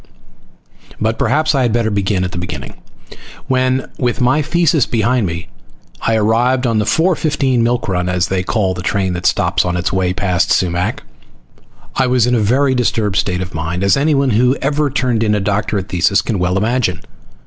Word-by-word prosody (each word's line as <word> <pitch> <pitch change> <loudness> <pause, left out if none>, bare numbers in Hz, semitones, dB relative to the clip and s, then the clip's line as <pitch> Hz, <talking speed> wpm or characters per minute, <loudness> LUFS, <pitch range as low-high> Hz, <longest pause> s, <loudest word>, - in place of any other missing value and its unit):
But 110 +1 -1
perhaps 145 +5 +1
I 135 - +1
had 120 -3 +1
better 115 -1 0
begin 100 -1 0
at 90 - -3
the 90 - -5
beginning 75 -8 -6 0.7
when, 130 0 +1
with 120 -1 -1
my 125 +4 +2
thesis 155 -2 +1
behind 115 -1 +1
me, 85 +3 -5 0.5
I 115 - +1
arrived 120 +4 +1
on 115 -3 +1
the 105 - 0
4:15 150 -5 +1
milk 120 +1 0
run, 90 -2 -1
as 90 0 +1
they 95 -1 -1
call 95 0 0
the 90 - -6
train 95 -1 -1
that 90 +1 -1
stops 95 -1 +1
on 90 0 -2
its 90 - -2
way 95 -1 +1
past 90 -1 0
Sumac. 90 0 0 0.9
I 130 - +2
was 125 -2 +2
in 125 - +1
a 120 - +2
very 130 +6 +2
disturbed 110 -5 0
state 90 -2 0
of 90 - -9
mind, 80 +3 -3
as 100 - +4
anyone 140 -2 +1
who 125 +4 +3
has - - -7
ever 145 +1 +1
turned 125 -4 0
in 105 -2 +2
a - - 0
doctorate 100 0 -2
thesis 90 +3 +2
can 110 -5 -2
well 90 +1 0
imagine. 110 -3 0
110 Hz, 190 wpm, -16 LUFS, 95-130 Hz, 0.9 s, as